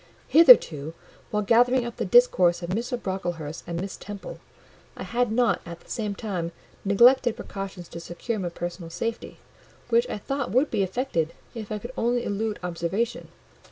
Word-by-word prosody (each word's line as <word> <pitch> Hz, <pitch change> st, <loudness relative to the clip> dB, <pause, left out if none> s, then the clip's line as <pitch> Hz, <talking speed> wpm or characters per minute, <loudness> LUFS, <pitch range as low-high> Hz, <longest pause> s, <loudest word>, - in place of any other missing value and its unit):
Hitherto, 165 Hz, -, +6 dB, 0.3 s
while 210 Hz, 0 st, 0 dB
gathering 245 Hz, +3 st, +4 dB
up 235 Hz, -, -7 dB
the -, -, -2 dB
discourse 185 Hz, -, +4 dB
of 170 Hz, -, -4 dB
Mr. 235 Hz, +4 st, -2 dB
Brocklehurst 175 Hz, -6 st, -4 dB
and 170 Hz, 0 st, -3 dB
Miss 190 Hz, +2 st, -5 dB
Temple, 205 Hz, -1 st, -8 dB, 0.6 s
I -, -, -5 dB
had 245 Hz, -1 st, 0 dB
not, 230 Hz, -4 st, +2 dB
at 170 Hz, 0 st, -9 dB
the -, -, -15 dB
same 210 Hz, -3 st, -2 dB
time, 180 Hz, -6 st, -4 dB, 0.3 s
neglected 240 Hz, +4 st, +5 dB
precautions 195 Hz, -3 st, -7 dB
to 170 Hz, -, -8 dB
secure 175 Hz, +7 st, -4 dB
my 180 Hz, -2 st, -2 dB
personal 175 Hz, 0 st, -6 dB
safety; 230 Hz, +7 st, -4 dB, 0.5 s
which 475 Hz, +1 st, +3 dB
I -, -, -3 dB
thought 275 Hz, +5 st, -3 dB
would 255 Hz, +9 st, +2 dB
be -, -, +1 dB
effected, 190 Hz, -, -1 dB, 0.2 s
if 220 Hz, -4 st, -7 dB
I 215 Hz, -, -1 dB
could 240 Hz, +5 st, -8 dB
only 240 Hz, +1 st, 0 dB
elude 210 Hz, +1 st, -2 dB
observation. 180 Hz, +7 st, -2 dB
205 Hz, 165 wpm, -25 LUFS, 175-240 Hz, 0.6 s, Hitherto